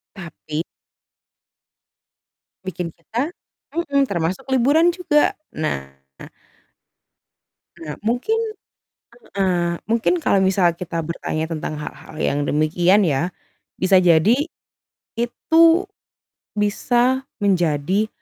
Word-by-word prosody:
Tapi 160 Hz, -4 st, -6 dB, 2.0 s
bikin 180 Hz, -2 st, -4 dB
kita 235 Hz, -, -4 dB, 0.4 s
mhm, 280 Hz, -5 st, +1 dB
termasuk 175 Hz, -2 st, -2 dB
liburan 285 Hz, +7 st, +4 dB
juga. 340 Hz, -4 st, +2 dB, 0.2 s
Nah 70 Hz, -, -2 dB, 1.9 s
Nah, 155 Hz, -2 st, -7 dB
mungkin 245 Hz, -, 0 dB, 1.0 s
heeh, 175 Hz, -3 st, +1 dB
mungkin 230 Hz, +8 st, +1 dB
kalau 195 Hz, -, +3 dB
misal 190 Hz, -2 st, +3 dB
kita 165 Hz, -1 st, -4 dB
bertanya 160 Hz, -1 st, -3 dB
tentang 155 Hz, -1 st, -4 dB
hal-hal 150 Hz, +1 st, -9 dB
yang 145 Hz, -, 0 dB
demikian 175 Hz, +6 st, +3 dB
ya, 160 Hz, +1 st, +1 dB, 0.5 s
bisa 185 Hz, 0 st, +4 dB
jadi 185 Hz, -, +4 dB, 0.7 s
itu 330 Hz, +10 st, +3 dB, 0.7 s
bisa 245 Hz, +5 st, +1 dB, 0.2 s
menjadi 185 Hz, +1 st, +1 dB
190 Hz, 85 wpm, -21 LUFS, 165-245 Hz, 2.0 s, liburan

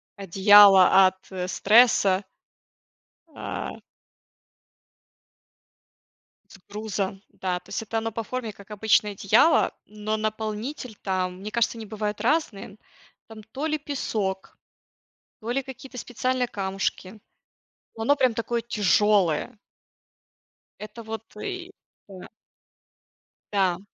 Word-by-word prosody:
одеяло 195 Hz, -1 st, +7 dB
от, 185 Hz, -, -3 dB
э, 180 Hz, -1 st, -4 dB
стресса. 205 Hz, -2 st, +4 dB, 1.1 s
А. -, -, -6 dB, 2.7 s
С -, -, -15 dB
грузом. 200 Hz, -2 st, -4 dB
Да. 180 Hz, -1 st, -3 dB
То -, -, -25 dB
есть -, -, -4 dB
это 225 Hz, +1 st, -3 dB
оно 225 Hz, 0 st, -3 dB
по 230 Hz, -, -3 dB
форме, 230 Hz, -2 st, -5 dB
как 200 Hz, +1 st, -17 dB
обычное 210 Hz, 0 st, +2 dB
одеяло, 210 Hz, -, +3 dB
но 215 Hz, +1 st, -4 dB
наполнитель 215 Hz, +3 st, -4 dB
там, 185 Hz, -2 st, -2 dB
мне 210 Hz, -, -6 dB
кажется, 235 Hz, 0 st, 0 dB
они 220 Hz, -, -8 dB
бывают 210 Hz, -1 st, -4 dB
разные, 230 Hz, -7 st, -1 dB, 0.5 s
там 220 Hz, -1 st, -12 dB
то 265 Hz, +8 st, -5 dB
ли 310 Hz, -1 st, -1 dB
песок, 215 Hz, -10 st, -4 dB, 0.8 s
то 225 Hz, -, -5 dB
ли 270 Hz, +3 st, 0 dB
какие-то 260 Hz, 0 st, -10 dB
специальные 255 Hz, +1 st, -2 dB
камушки, 195 Hz, 0 st, -4 dB, 0.8 s
но 225 Hz, -, -5 dB
оно 285 Hz, +5 st, +3 dB
прям 250 Hz, -4 st, +2 dB
такое 230 Hz, +1 st, -2 dB
тяжелое. 210 Hz, -3 st, +1 dB, 1.2 s
Это 220 Hz, +2 st, -9 dB
вот 220 Hz, 0 st, -6 dB
и 370 Hz, -, -6 dB, 0.4 s
Да. 185 Hz, -2 st, -11 dB, 1.2 s
Да. 185 Hz, -3 st, +1 dB
215 Hz, 110 wpm, -25 LUFS, 195-235 Hz, 2.7 s, одеяло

